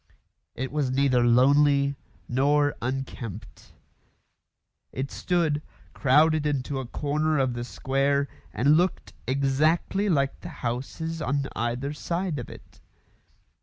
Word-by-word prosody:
It 130 +1 -4
was 145 -3 0
neither 130 -2 +2
lonely 140 +3 +4 0.3
nor 145 +3 +2
unkempt. 120 -5 -6 1.2
It 135 +2 -4
stood, 165 -5 0 0.3
crowded 150 +3 +3
into 140 -1 -2
a 130 - -5
corner 150 +4 0
of 130 -2 +1
the 120 0 -4
square, 135 +5 0 0.2
and 140 - +3
looked 180 +2 -1
exactly 150 +9 +1
like 140 -5 +1
the 175 - -8 0.2
houses 155 +7 -3
on 140 0 0
either 120 +5 -2
side 170 0 -2
of 120 - -7
it. - - -14
140 Hz, 115 wpm, -26 LUFS, 130-150 Hz, 1.2 s, lonely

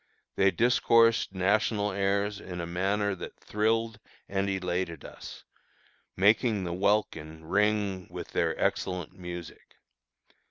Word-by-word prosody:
They 100 0 +4
discoursed 115 +2 +3
national 105 +2 +1
airs 100 +1 0
in 90 -3 -7
a 85 - -3
manner 100 +4 0
that 95 - -8
thrilled 110 +1 0 0.3
and 95 0 -1
elated 90 -4 -2
us, - - -10 0.7
making 105 +1 +3
the 85 -1 -3
welkin 80 -5 -1
ring 100 0 +1
with - - -7
their - - 0
excellent 90 -3 -1
music. 90 -2 -9
100 Hz, 115 wpm, -28 LUFS, 90-105 Hz, 0.7 s, They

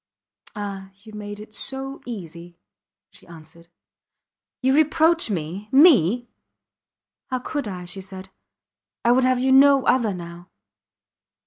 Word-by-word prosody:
Ah! 200 -2 -6
You 215 -1 -14
made 205 0 -8
it 215 0 -12
so 270 +4 -6
easy, 175 -6 -9 0.5
she - - -19
answered. 165 0 -15 1.0
You 265 +1 +3
reproach 320 0 +3
me 185 +3 -5
me! 250 - +5 1.0
How 255 - -2
could 280 0 -4
I? 180 -3 -6
she 185 +2 -6
said; 190 0 -11 0.7
I 235 - +5
would 255 +1 +3
have 255 0 +2
you 260 +1 +1
no 275 0 +6
other 230 -6 +2
now. 170 0 -10
210 Hz, 125 wpm, -22 LUFS, 180-265 Hz, 1.0 s, no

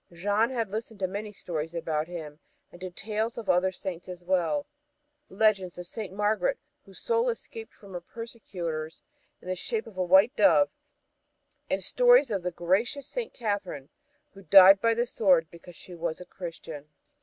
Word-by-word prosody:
Jeanne 205 +6 +1
had 230 -6 -2
listened 220 0 -5
to 190 - 0
many 205 +3 -5
stories 165 -4 -5
about 160 -2 -2
him, 160 -4 -8 0.3
and 175 - -15
to 185 - -4
tales 215 +5 -3
of 230 - -6
other 180 +1 +3
Saints 185 -1 -7
as 180 -1 -8
well 185 - 0 0.6
legends 195 -3 +1
of 175 - -7
St. 210 +1 -6
Margaret, 215 - 0 0.3
whose - - -14
soul 470 +1 +1
escaped 455 -1 -7
from 200 -3 -15
her 175 - -5
persecutors 175 -8 -6 0.4
in - - -12
the 185 - -1
shape 220 +4 -3
of 220 -5 -13
a - - +2
white 190 +9 +5
dove, 290 -1 +5 1.0
and - - -1
stories - - +5
of 195 -3 -1
the 180 - -2
gracious 195 +11 0
St. 480 -2 -4
Catherine, 200 - -4 0.4
who 195 - -13
died 195 +2 +8
by 230 0 +3
the 240 +1 +1
sword 185 -9 +3
because 170 +1 -13
she 180 - -12
was 170 -1 -3
a 180 - -9
Christian. 165 -5 -8
190 Hz, 175 wpm, -28 LUFS, 175-225 Hz, 1.0 s, died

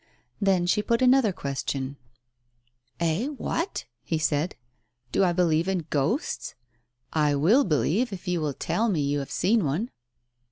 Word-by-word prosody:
Then 190 -3 +3
she 180 +4 +2
put 230 +4 +1
another 255 -4 +5
question 140 -3 -3 0.5
— 120 0 -44 0.3
"Eh! 170 - +1
What?" 330 +5 -3 0.2
he 165 - -2
said. 155 +2 0 0.6
"Do 195 - +3
I'believe 170 -2 +2
in 185 -4 -1
ghosts? 155 - -1 0.6
I 150 -2 +2
will 195 - +4
believe 185 - +1
you 195 - -5
if 180 - -13
you 175 -2 0
will 145 -3 -2
tell 215 +8 0
me 170 -7 +1
you 145 0 0
have 140 - -5
seen 215 +2 +2
one." 165 - -1
175 Hz, 155 wpm, -26 LUFS, 145-210 Hz, 0.6 s, another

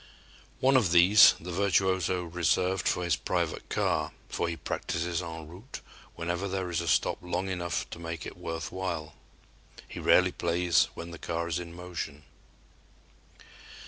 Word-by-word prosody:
One 135 +1 +5
of 110 -9 +3
these 90 +4 +8
the 90 +2 -7
virtuoso 95 -1 +1
reserved 90 +2 0
for 90 - +1
his 85 -4 +2
private - - -2
car, - - 0 0.2
for - - -1
he 85 - -4
practices 85 +1 -2
en 80 -2 -7
route 95 +10 -10 0.4
whenever 85 +3 -2
there 95 -2 -3
is 85 - 0
a 85 - -5
stop 70 - +2
long 90 +2 -2
enough 85 -2 -2
to - - -7
make 85 -2 -5
it - - -7
worth 80 -1 -5
while. 85 -5 -4 0.7
He - - -8
rarely 90 0 +4
plays 85 -1 +2
when 85 +1 -7
the 85 - -9
car 85 0 -3
is 85 0 -1
in 85 -1 -8
motion. 85 -5 -6
85 Hz, 155 wpm, -29 LUFS, 85-90 Hz, 0.7 s, these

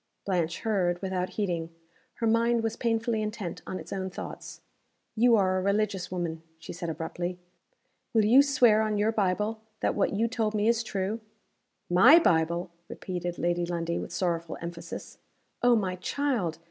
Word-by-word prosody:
Blanche 175 -4 -1
heard, 185 -6 +1
without 185 -1 -1
heeding. 175 -6 -1 0.5
Her 230 - -2
mind 230 +1 +2
was 225 0 -1
painfully 230 -1 0
intent 210 -5 -4
on 185 - -4
its - - -8
own 190 -1 -3
thoughts. 185 - -8 0.5
"You 235 +1 +5
are 185 -3 +2
a - - -2
religious 200 -1 0
woman," 170 -3 -3 0.2
she 160 - -9
said, 170 -1 -5
abruptly. 175 +3 -4 0.7
"Will 220 -2 +3
you 245 +6 +7
swear 245 -6 +4
on 215 -1 0
your 210 +2 +2
Bible, 210 +1 0 0.2
that - - +1
what 200 - +1
you 220 +3 +1
told 220 -2 -1
me 210 +1 +1
is 230 0 +3
true?" 205 0 -2 0.7
"My 230 - +7
Bible!" 170 - +2 0.2
repeated 175 -1 -5
Lady 175 0 0
Lundie 170 -1 -2
with - - -6
sorrowful 170 -2 -2
emphasis. 170 0 -8 0.4
"Oh, 245 0 +5
my 185 -4 -1
child! 215 - -1
195 Hz, 160 wpm, -28 LUFS, 175-225 Hz, 0.7 s, you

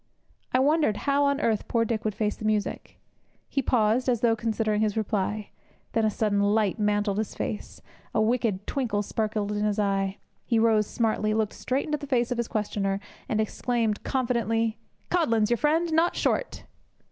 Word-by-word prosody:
I - - +3
wondered 285 -5 +3
how 285 0 +3
on 280 0 +2
earth 225 -7 0
poor 230 -1 +1
Dick 225 -1 -2
would 215 -2 -1
face 210 -1 0
the - - -10
music. 215 -1 -2 0.5
He 275 - 0
paused, 245 0 +2
as 240 -3 +1
though 230 -2 +4
considering 215 -1 0
his 215 -1 0
reply. 210 -1 -1 0.4
Then 225 -1 +1
a - - +3
sudden 210 -1 0
light 205 +1 +2
mantled 205 -1 +1
his 220 - -3
face. 210 - -5 0.3
A - - 0
wicked 215 -3 +1
twinkle 225 -7 -1
sparkled 210 -1 -2
in 210 0 -1
his 210 0 0
eye. 195 -1 0 0.3
He 235 - +1
rose 220 -2 +3
smartly, 215 -2 0
looked 220 -1 0
straight 260 +2 -1
into 300 -1 -1
the 285 - -7
face 245 -2 +1
of 245 - -1
his 235 - 0
questioner, 200 -3 -1 0.3
and 220 - 0
exclaimed 220 0 0
confidently: 230 -3 0 0.3
'Codlin's 230 -11 +2
your 240 - +3
friend, 320 +5 +1
not 330 +2 +3
Short!' - - -1
220 Hz, 180 wpm, -26 LUFS, 210-245 Hz, 0.5 s, though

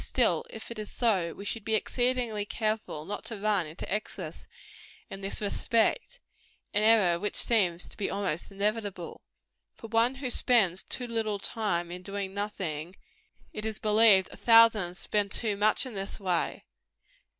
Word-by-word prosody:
Still, - - +1
if 225 +1 -8
it 230 - -6
is 210 - -5
so, 195 -8 +1
we 200 - -9
should 225 0 -4
be 220 +1 0
exceedingly 245 -2 -1
careful 215 -7 -3
not 205 - -5
to 225 -1 -3
run 200 -4 +1
into 155 +4 -8
excess 210 +1 -5 0.6
in 195 - -7
this 195 +2 -2
respect 230 - 0 0.5
an 205 - +2
error 210 -6 +4
which 205 +3 -3
seems 180 -7 +2
to - - -12
be 205 - -2
almost 195 -3 -2
inevitable. 200 -3 -3 0.5
For 225 - -11
one 230 +3 +2
who 265 -2 -4
spends 205 -8 +3
too 250 - -3
little 225 -3 -1
time 195 -5 -2
in 180 +1 -6
doing 195 0 -5
nothing, 185 -5 -4 0.6
it 215 - -6
is 220 -1 -3
believed 210 -3 +5
a - - -9
thousand 225 -6 +5
spend 205 0 -1
too 215 -2 +1
much 210 +5 +3
in 255 - -7
this 195 +1 -5
way. 185 -4 -1
210 Hz, 160 wpm, -28 LUFS, 195-225 Hz, 0.6 s, believed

